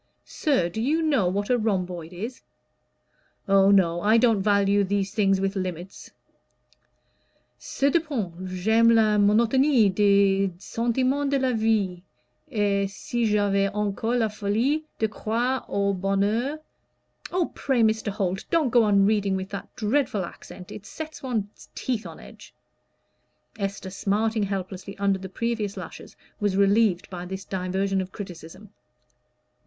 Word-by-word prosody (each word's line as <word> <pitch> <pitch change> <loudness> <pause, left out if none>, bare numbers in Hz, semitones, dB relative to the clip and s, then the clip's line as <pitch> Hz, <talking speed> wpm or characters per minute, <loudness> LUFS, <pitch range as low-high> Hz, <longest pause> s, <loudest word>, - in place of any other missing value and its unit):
Sir, 270 - 0
do 195 +6 -4
you 310 +7 +1
know 275 - +2
what 200 +5 -1
a 245 - +3
rhomboid 180 -6 -2
is? 220 +8 -7 1.1
Oh, 195 0 +5
no, 175 -4 +3
I 215 +4 +4
don't 225 -4 +3
value 200 0 +3
these 200 0 -1
things 195 -3 +2
with 195 +1 -1
limits. 185 -1 -5 1.5
'Cependant, 270 - -1
j'aime 220 +6 +3
la 215 -2 +4
monotonie 230 +3 +4
des 200 -1 +3
sentimens 255 +7 -1
de 280 - +2
la 260 -1 0
vie, 215 -5 0 0.5
et 200 -2 0
si 235 +4 -3
j'avais 200 -2 +2
encore 210 +3 -1
la 230 -2 +2
folie 225 +9 -1
de 220 - +1
croire 235 +4 -2
au 200 0 0
bonheur 200 +9 0 0.4
'" - - -17
"Oh, 355 -1 0
pray, 260 -4 +1
Mr. 220 0 +1
Holt, 190 -2 -2
don't 325 -6 +2
go 240 - +5
on 200 -1 +4
reading 205 -2 +1
with 190 0 -4
that 200 - -7
dreadful 220 -4 0
accent; 180 +1 -12
it 200 - -9
sets 315 0 -8
one's 220 -6 -4
teeth 240 -4 -3
on - - -11
edge." - - -14 1.0
Esther, 195 -1 -4
smarting 215 +3 0
helplessly 195 0 -4
under 195 -1 +1
the 190 0 -8
previous 220 0 -3
lashes, - - -9 0.2
was 205 -3 0
relieved 200 -1 +3
by 175 -1 -6
this 190 +2 -7
diversion 190 +1 -1
of 185 0 -7
criticism. 185 +1 -10
205 Hz, 140 wpm, -25 LUFS, 195-230 Hz, 1.5 s, Oh